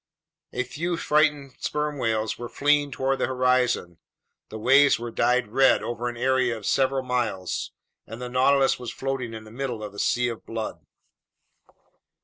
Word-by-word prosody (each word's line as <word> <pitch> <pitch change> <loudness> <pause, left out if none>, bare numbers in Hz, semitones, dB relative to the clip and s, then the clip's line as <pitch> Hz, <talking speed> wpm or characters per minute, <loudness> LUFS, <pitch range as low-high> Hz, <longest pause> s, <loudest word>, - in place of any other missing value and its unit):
A 125 - -1
few 165 +7 -3
frightened 150 -4 +1
sperm 150 -1 -2
whales 110 -2 0
were 120 -1 -6
fleeing 145 0 +2
toward 135 +1 -1
the - - +1
horizon. 125 -9 +1 0.5
The 110 - -7
waves 135 +5 +5
were 120 0 -6
dyed 125 -1 +1
red 135 +4 +4
over 120 +1 -3
an 120 - -8
area 130 -1 +1
of 105 - -10
several 135 0 +1
miles, 120 -8 -2 0.4
and 115 +2 -8
the 125 - -5
Nautilus 135 +2 +3
was 125 -2 -5
floating 130 -4 -4
in 110 - -8
the 110 - -14
middle 120 -3 -4
of 105 -1 -7
a 100 - -8
sea 120 0 +1
of 115 - -7
blood. 115 -1 -5
125 Hz, 165 wpm, -25 LUFS, 115-135 Hz, 0.5 s, waves